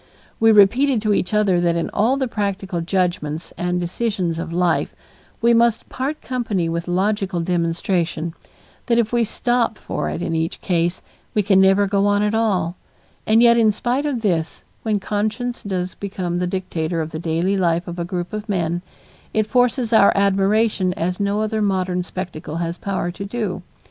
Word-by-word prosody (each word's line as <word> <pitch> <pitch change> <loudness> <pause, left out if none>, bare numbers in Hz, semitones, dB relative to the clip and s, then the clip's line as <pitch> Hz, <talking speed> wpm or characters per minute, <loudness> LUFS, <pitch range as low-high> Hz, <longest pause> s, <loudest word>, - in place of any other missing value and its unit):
We 225 0 +6
repeated 235 +6 +5
to 210 -1 +2
each 180 - 0
other 205 -4 +2
that 170 -1 +2
in 170 - -2
all 235 +6 +2
the 265 -2 0
practical 195 -5 -2
judgments 170 -3 -2
and 180 0 -1
decisions 180 -2 -2
of 165 - -5
life, 175 -1 0 0.5
we 235 0 +5
must 230 -1 +2
part 275 +4 -4
company 225 -9 -1
with 170 +1 -3
logical 190 0 0
demonstration; 170 -1 -1 0.5
that 235 -2 +3
if 235 0 +1
we 240 -1 +3
stop 235 +1 0
for - - -3
it 170 - -4
in 165 - -2
each 160 +1 -1
case, 175 -1 0 0.3
we 210 - +3
can 195 -1 +4
never 195 +1 +5
go 200 0 +1
on 205 0 +2
at 210 +1 0
all; 185 -6 0 0.5
and 225 +2 +5
yet, 235 0 +6
in 220 -2 +5
spite 250 +7 -1
of 260 -5 -2
this, 165 -6 -1 0.2
when 215 -2 0
conscience 220 +5 -2
does 185 -2 -3
become 185 -3 -3
the 180 - 0
dictator 175 -3 -2
of 160 0 -3
the 155 - -5
daily 170 +4 0
life 175 -2 +1
of 175 0 -6
a - - -1
group 175 +1 -4
of 215 0 -5
men, 175 -3 -1 0.5
it 215 -1 +3
forces 245 +1 +1
our 200 -2 +7
admiration 200 0 +2
as 180 +2 -2
no 200 +1 0
other 215 0 -1
modern 185 -3 0
spectacle 175 -4 -6
has 170 +1 -3
power 190 -3 -2
to 190 - -7
do. 200 -3 -3
195 Hz, 180 wpm, -21 LUFS, 175-215 Hz, 0.5 s, our